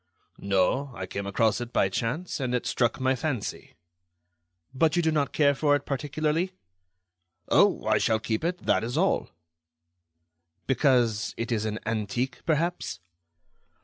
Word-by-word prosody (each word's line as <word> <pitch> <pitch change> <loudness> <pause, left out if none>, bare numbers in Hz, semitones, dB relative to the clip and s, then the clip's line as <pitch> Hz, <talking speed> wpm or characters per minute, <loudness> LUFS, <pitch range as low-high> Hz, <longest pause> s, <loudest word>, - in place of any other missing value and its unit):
"No, 100 +8 +1
I - - -4
came 100 0 -5
across 110 +2 +1
it 120 0 -6
by 95 - +3
chance 125 - -3
and 125 -2 -1
it 125 - -2
struck 120 -2 0
my 130 0 +2
fancy." 125 -5 -4 1.0
"But 155 +3 +2
you 175 - +2
do 160 - +2
not 150 -2 0
care 145 -2 +3
for 145 +1 +2
it 145 - -3
particularly?" 155 +5 -1 1.0
"Oh! - - +4
I - - +3
shall 110 - +2
keep 110 +4 -2
it—that 175 -9 0
is 120 +5 -3
all." 190 +4 +1 1.4
"Because 120 -6 +2
it 115 +1 -3
is 110 -2 0
an 110 0 -2
antique, 115 +4 -2
perhaps?" 165 - -1
130 Hz, 145 wpm, -27 LUFS, 110-150 Hz, 1.4 s, Oh